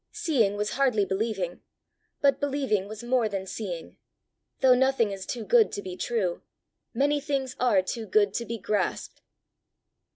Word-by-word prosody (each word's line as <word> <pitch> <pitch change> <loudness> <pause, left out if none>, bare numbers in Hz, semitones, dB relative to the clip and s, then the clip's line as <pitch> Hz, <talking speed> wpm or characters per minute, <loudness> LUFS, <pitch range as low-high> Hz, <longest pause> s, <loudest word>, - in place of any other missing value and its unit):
Seeing 230 -11 +1
was 210 0 -1
hardly 250 -7 +2
believing, 190 -2 -2 0.6
but 280 -1 +3
believing 270 -9 0
was 215 +2 -8
more 240 -2 +1
than 195 -2 -3
seeing: 185 -3 -6 0.6
though 260 -1 +7
nothing 255 -4 +2
is 195 -1 -6
too 240 -2 -4
good 470 -3 +4
to - - -3
be 185 -1 -6
true, 195 -5 -1 0.5
many 290 +1 +1
things 270 -3 -2
are 210 -7 +3
too 220 +4 -4
good 205 +1 +3
to 235 - -2
be 230 0 -4
grasped. 205 0 -2
225 Hz, 155 wpm, -27 LUFS, 200-265 Hz, 0.6 s, though